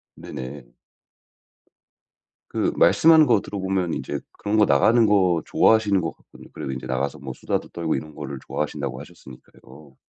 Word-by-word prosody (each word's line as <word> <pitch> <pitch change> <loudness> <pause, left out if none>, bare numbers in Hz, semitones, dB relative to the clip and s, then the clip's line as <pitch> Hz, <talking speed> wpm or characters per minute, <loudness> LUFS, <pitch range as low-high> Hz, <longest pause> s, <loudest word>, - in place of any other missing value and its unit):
네네. 65 +1 -8 1.8
그 - - 0
말씀하는 160 -1 +6
거 115 -5 +3
들어보면 95 -3 -2
인제 - - -4
그런 105 +1 -2
거 105 - +5
나가는 110 - +4
거 95 -5 +3
좋아하시는 105 -4 +3
것 80 -1 -3
같거든요. - - -17
그리고 65 - -5
인제 65 -1 -6
나가서 65 +2 -2
뭐 65 -2 -7
수다도 - - -3
떨고 85 -2 -2
이런 75 +3 -6
거를 70 -2 -7
좋아하신다고 75 -1 -4
하셨으니까요. 65 +2 -15
85 Hz, 365 characters per minute, -23 LUFS, 70-105 Hz, 1.8 s, 말씀하는